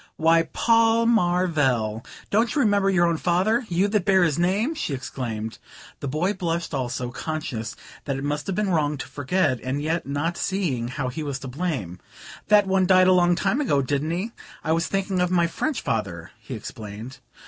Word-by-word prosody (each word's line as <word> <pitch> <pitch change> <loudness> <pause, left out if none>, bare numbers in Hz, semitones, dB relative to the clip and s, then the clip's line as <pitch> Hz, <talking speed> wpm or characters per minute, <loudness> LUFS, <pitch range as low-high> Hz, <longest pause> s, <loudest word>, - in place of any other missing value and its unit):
"Why, 165 +1 +3
Paul 230 0 +3
Marvell, 155 - +2 0.3
don't 225 +6 +2
you 290 - +3
remember 205 -4 +3
your 180 -3 +3
own 170 -1 +1
father, 205 +9 +1
you 180 +3 +2
that 210 -2 +1
bear 190 -2 +4
his 165 -2 +1
name?" 200 - +1
she 295 - -3
exclaimed. 115 -4 -5 0.4
The 140 - -4
boy 160 +9 0
blushed 170 -4 -3
also, 125 -2 -2
conscious 125 -6 -4 0.3
that 140 -2 -2
it 135 - -5
must 145 0 -2
have 190 - -1
been 205 -1 0
wrong 150 -3 +1
to - - -6
forget, 145 -2 0
and 130 +3 -3
yet 160 +2 -2
not 145 +5 -1
seeing 155 -12 -1
how 130 +1 -3
he 140 +5 -5
was 140 -3 -3
to 135 - -6
blame. 125 - -3 0.5
"That 210 -1 +6
one 190 -1 +2
died 185 0 +6
a - - +6
long 175 -1 +4
long 175 - +3
time 205 +10 0
ago, 145 - +2
didn't 145 +3 -1
he? 185 +7 -2 0.3
I 160 - -1
was 165 +1 +1
thinking 195 -1 -1
of 180 - +2
my 175 -1 +3
French 285 - -2
father," 95 -7 -3
he - - -7
explained. 110 +4 -8
165 Hz, 195 wpm, -24 LUFS, 135-190 Hz, 0.5 s, That